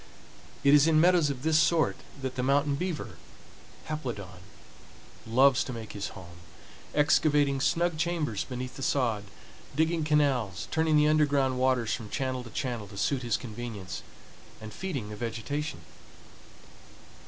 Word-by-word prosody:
It 140 Hz, -, +6 dB
is 150 Hz, +1 st, +7 dB
in 160 Hz, -1 st, +4 dB
meadows 175 Hz, -2 st, +4 dB
of 135 Hz, -2 st, -5 dB
this 155 Hz, 0 st, +4 dB
sort 165 Hz, -1 st, +3 dB, 0.3 s
that 130 Hz, -1 st, -2 dB
the 125 Hz, -, -2 dB
mountain 140 Hz, +2 st, +2 dB
beaver 170 Hz, +2 st, -4 dB, 0.7 s
(Haplodon) 120 Hz, -, -5 dB, 0.9 s
loves 130 Hz, +3 st, +4 dB
to 130 Hz, -, -5 dB
make 115 Hz, -2 st, -7 dB
his 100 Hz, -1 st, -4 dB
home, 85 Hz, -2 st, -12 dB, 0.6 s
excavating 145 Hz, -2 st, +3 dB
snug 170 Hz, +1 st, +1 dB
chambers 160 Hz, -, -1 dB
beneath 125 Hz, 0 st, -6 dB
the -, -, -7 dB
sod, 120 Hz, -6 st, 0 dB, 0.5 s
digging 160 Hz, +1 st, +1 dB
canals, 135 Hz, -, +1 dB
turning 160 Hz, -1 st, +3 dB
the 150 Hz, 0 st, +5 dB
underground 140 Hz, -4 st, +2 dB
waters 125 Hz, -4 st, +2 dB
from 110 Hz, -4 st, -5 dB
channel 130 Hz, -1 st, -2 dB
to 115 Hz, -, -10 dB
channel 120 Hz, -2 st, -3 dB
to 100 Hz, 0 st, -12 dB
suit 130 Hz, +5 st, 0 dB
his 120 Hz, -4 st, 0 dB
convenience, 110 Hz, -5 st, -6 dB, 0.6 s
and 110 Hz, -1 st, -9 dB
feeding 140 Hz, -, -4 dB
the 105 Hz, -, -6 dB
vegetation. 115 Hz, -, -4 dB
135 Hz, 140 wpm, -28 LUFS, 115-150 Hz, 0.9 s, is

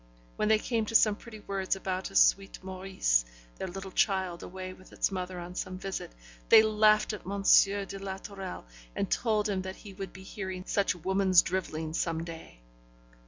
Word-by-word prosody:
When 215 Hz, -, 0 dB
they 220 Hz, 0 st, +5 dB
came 225 Hz, 0 st, -1 dB
to 225 Hz, -, -4 dB
some 215 Hz, -2 st, +6 dB
pretty 220 Hz, 0 st, -12 dB
words 195 Hz, -1 st, -1 dB
about 190 Hz, -1 st, -3 dB
a -, -, -14 dB
sweet -, -, +4 dB
Maurice, 185 Hz, -, +1 dB, 0.4 s
their -, -, -3 dB
little 190 Hz, +1 st, -7 dB
child 190 Hz, -3 st, +1 dB
away 185 Hz, 0 st, -7 dB
with 185 Hz, 0 st, -17 dB
its -, -, 0 dB
mother 185 Hz, -1 st, -4 dB
on 175 Hz, +1 st, -7 dB
some 185 Hz, 0 st, -4 dB
visit, 195 Hz, 0 st, -5 dB, 0.4 s
they 220 Hz, -, +9 dB
laughed 215 Hz, 0 st, +4 dB
at 210 Hz, -, -6 dB
M. 200 Hz, +1 st, -4 dB, 0.2 s
de 195 Hz, 0 st, -4 dB
la 190 Hz, -1 st, -5 dB
Tourelle, 195 Hz, -, -7 dB, 0.3 s
and 195 Hz, -, -2 dB
told 215 Hz, -3 st, +1 dB
him 195 Hz, -2 st, -1 dB
that 190 Hz, 0 st, -6 dB
he 205 Hz, -3 st, -12 dB
would 195 Hz, -1 st, -7 dB
be 190 Hz, +2 st, -12 dB
hearing 190 Hz, -1 st, -6 dB
such 200 Hz, -2 st, +1 dB
woman's 190 Hz, +1 st, +4 dB
drivelling 160 Hz, -4 st, -3 dB
some 165 Hz, -1 st, -1 dB
day. 165 Hz, -, -10 dB
190 Hz, 185 wpm, -30 LUFS, 185-200 Hz, 0.4 s, they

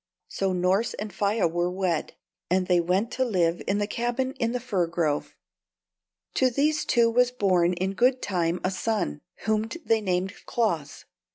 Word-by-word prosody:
So 195 Hz, -1 st, -1 dB
Norss 185 Hz, +5 st, +1 dB
and 210 Hz, -2 st, -6 dB
Faia 205 Hz, +1 st, +1 dB
were 175 Hz, +2 st, 0 dB
wed, 180 Hz, -3 st, -2 dB, 0.3 s
and 185 Hz, +1 st, +2 dB
they 180 Hz, -1 st, +3 dB
went 185 Hz, +7 st, 0 dB
to 260 Hz, -, 0 dB
live 175 Hz, -8 st, +1 dB
in 200 Hz, -, +1 dB
the 205 Hz, -, +1 dB
cabin 240 Hz, +4 st, -1 dB
in 230 Hz, -1 st, +1 dB
the 250 Hz, -, -1 dB
fir 200 Hz, -8 st, 0 dB
grove. 165 Hz, -3 st, -1 dB, 1.0 s
To 260 Hz, -, +3 dB
these 300 Hz, +5 st, +1 dB
two 235 Hz, -2 st, +4 dB
was 250 Hz, +1 st, +4 dB
born 185 Hz, -7 st, +2 dB
in 185 Hz, +2 st, -2 dB
good 250 Hz, +6 st, +3 dB
time 175 Hz, -4 st, -1 dB
a 185 Hz, -, +1 dB
son, 185 Hz, -, -2 dB, 0.2 s
whom 220 Hz, +1 st, 0 dB, 0.2 s
they 225 Hz, -1 st, +2 dB
named 185 Hz, 0 st, -1 dB
Claus. 170 Hz, -12 st, -1 dB
195 Hz, 170 wpm, -26 LUFS, 180-230 Hz, 1.0 s, two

